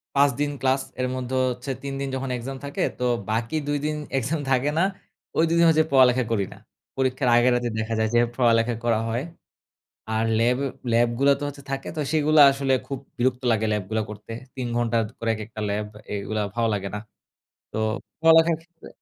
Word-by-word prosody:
৫ 140 +1 +5
দিন 145 0 0
ক্লাস, 135 +1 +2 0.2
এর 125 - +1
মধ্যে 130 0 -3
হচ্ছে 125 +2 -4
৩ 140 - -4
দিন 140 - -2
যখন 135 0 -3
এক্সাম 135 +3 -6
থাকে, 140 - -4 0.2
তো - - -2 0.3
বাকি 115 +6 -1
২ 145 0 +1
দিন 155 0 0 0.2
এক্সাম 145 +5 -1
থাকে 135 +3 +2
না, 175 - +4 0.5
ওই - - +5
২ - - +1
দিন 170 - +5
হচ্ছে 155 0 +4
পড়ালেখা 130 -1 +5
করি 100 -4 +1
না। - - -16 0.4
পরীক্ষার 130 -1 +1
আগের 120 +1 +5
রাতে 120 -1 0
দেখা 110 +1 -2
যায় 110 0 +1
যে, 120 - +6 0.2
পড়ালেখা 115 -1 +3
করা 115 -2 +2
হয় 120 +4 -1 0.9
আর 110 +1 +1 0.2
ল্যাব, 120 +2 +3 0.3
ল্যাবগুলা 120 +4 +3
তো - - -5
হচ্ছে 140 -1 -8
থাকে 135 0 -3
তো 150 - 0
সেগুলা 155 -1 +4
আসলে 135 -1 0
খুব 135 -2 -4 0.2
বিরক্ত 125 +1 +1
লাগে 110 0 +1
ল্যাবগুলা 105 +1 -1
করতে। 105 +2 -9 0.2
৩ 125 -2 -3
ঘন্টা 120 -1 +1 0.2
করে 115 - -2
এক - - -9
একটা 110 0 -8
ল্যাব। 105 +1 -2 0.3
এগুলা 105 +1 -2
ভালো 115 -1 +1
লাগে 100 -1 -2
না। - - -3 0.7
তো - - -6 0.4
পড়ালেখার 165 0 +6
ক্ষেত্রে 165 0 -16
125 Hz, 195 wpm, -24 LUFS, 115-140 Hz, 0.9 s, যে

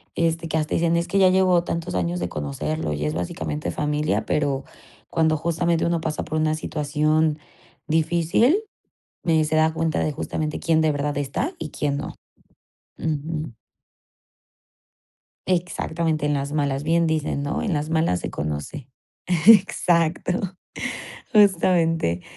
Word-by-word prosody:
este, 165 0 0
que 160 - -1
hasta 155 -1 -1
dicen: 170 0 +2
"Es 170 +1 -1
que 195 - -1
ya 190 -1 +6
llevo 185 -2 +3
tantos 170 - -3
años 90 0 -1
de 90 -1 -2
conocerlo 75 +1 -3
y 75 +1 -3
es 75 +1 -1
básicamente 80 -1 -3
familia", 150 - -1
pero, 140 -2 0 0.4
cuando 160 -1 +2
justamente 170 +1 0
uno 170 -1 +1
pasa 155 -1 -3
por 155 0 -3
una 155 0 +2
situación 155 0 0 0.5
difícil, 170 - +2 0.6
me 160 -2 +3
se 155 - -1
da 160 0 +4
cuenta 160 0 -1
de 155 - 0
justamente 155 +1 -3
quién 160 -1 +2
de 155 - +3
verdad 145 0 -2
está 145 - -2
y - - -5
quién 140 -1 -2
no. 145 - -6 0.8
Ujú. 155 -4 -3 1.9
Exactamente, 170 -3 -1
en 150 - +1
las 140 +1 -2
malas, 140 -2 0
bien 165 +1 +2
dicen, 155 -2 -1
¿no? 145 +3 -2
En 195 - 0
las 150 +1 -2
malas 160 - +1
se - - -4
conoce. 75 - -5 0.6
Exacto, 180 -5 +4 1.0
justamente. 170 - +3
155 Hz, 140 wpm, -23 LUFS, 145-170 Hz, 1.9 s, ya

